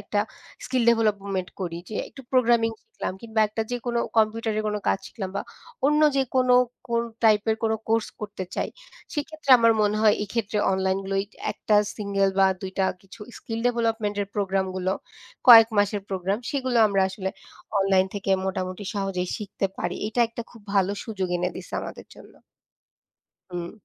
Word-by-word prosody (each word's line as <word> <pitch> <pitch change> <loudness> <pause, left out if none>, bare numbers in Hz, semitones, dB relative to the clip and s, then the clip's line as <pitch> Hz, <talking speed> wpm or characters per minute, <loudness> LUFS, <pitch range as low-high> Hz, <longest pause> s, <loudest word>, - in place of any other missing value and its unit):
একটা 205 - -1 0.4
skill 255 -2 0
development 200 -5 0
করি 170 -2 -3
যে 215 - -5
একটু 270 - -12
প্রোগ্রামিং 235 -2 +4
শিখলাম 450 - -5
কিংবা 220 -1 -1
১ 210 - -17
টা - - +3
যে - - +1
কোনো 235 -1 +1 0.2
কম্পিউটারে 220 0 +1
কোনো 210 0 -1
কাজ - - +2
শিখলাম 190 -4 -6
বা - - -1 0.4
অন্য 300 +1 +3 0.2
যে 270 - +4
কোনো 255 -1 +4 0.3
কোন 235 0 +1 0.2
টাইপের 220 0 +4
কোনো 220 0 +2
কোর্স 225 0 +2
করতে 205 -2 -5
চাই, - - -1 0.5
সেক্ষেত্রে 305 -1 -3
আমার 230 0 +5
মনে 210 0 +2
হয় 210 -1 +6
এক্ষেত্রে 210 0 -2
অনলাইনগুলোই 195 +1 0 0.3
১ - - -8
টা 210 - +6 0.2
সিঙ্গেল 200 -2 +1
বা 190 - +7 0.2
২ 190 - -4
টা 190 - +3 0.2
কিছু 195 +3 -15 0.2
স্কিল 225 0 -5
ডেভেলপমেন্টের 220 -4 -1
প্রোগ্রামগুলো 190 -1 0 0.6
কয়েক 225 -1 +11
মাসের 205 0 +1
প্রোগ্রাম, 190 +2 -1
সেগুলো 260 -4 0
আমরা 195 -1 +2
আসলে 190 -1 -4 0.5
অনলাইন 190 -1 +3
থেকে 195 -1 -3 0.2
মোটামুটি 185 +1 -3
সহজেই 195 -3 -2
শিখতে 200 -1 -2
পারি। - - -2
এটা 240 +2 -1
একটা 230 0 -6
খুব 230 - -15
ভালো 195 0 +3
সুযোগ 195 -5 -3
এনে 180 +1 0
দিছে 185 - -10
আমাদের - - -8
জন্য। - - -15 1.2
হুম। 175 -1 -4
210 Hz, 165 wpm, -25 LUFS, 195-230 Hz, 1.2 s, কয়েক